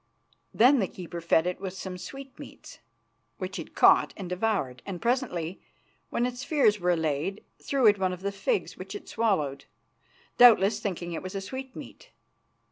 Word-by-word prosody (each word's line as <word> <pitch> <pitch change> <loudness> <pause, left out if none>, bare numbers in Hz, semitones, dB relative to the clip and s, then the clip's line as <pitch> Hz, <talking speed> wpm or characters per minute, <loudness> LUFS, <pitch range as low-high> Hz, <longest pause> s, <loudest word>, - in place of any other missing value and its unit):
Then 255 +4 +5
the 195 - +1
keeper 175 -2 -8
fed 165 0 +3
it 180 0 -3
with 190 -1 -5
some 190 -1 -6
sweetmeats, 270 +9 -10 0.6
which - - -5
it - - -9
caught - - +5
and 190 - -6
devoured, 180 - -1
and 190 -3 -6
presently, 220 - -1 0.5
when 240 - 0
its 250 +1 -4
fears 275 -9 +3
were 180 0 0
allayed, 160 +3 -1 0.2
threw 275 -3 0
it 205 -2 +6
one 185 -1 +1
of 180 0 -7
the 200 +1 -2
figs, 425 - -2
which - - -8
it 410 - -8
swallowed, 155 -12 -1 0.7
doubtless 220 -3 +7
thinking 175 -5 -4
it 165 - -5
a 185 +1 -4
sweetmeat. 265 - -9
195 Hz, 160 wpm, -27 LUFS, 180-245 Hz, 0.7 s, doubtless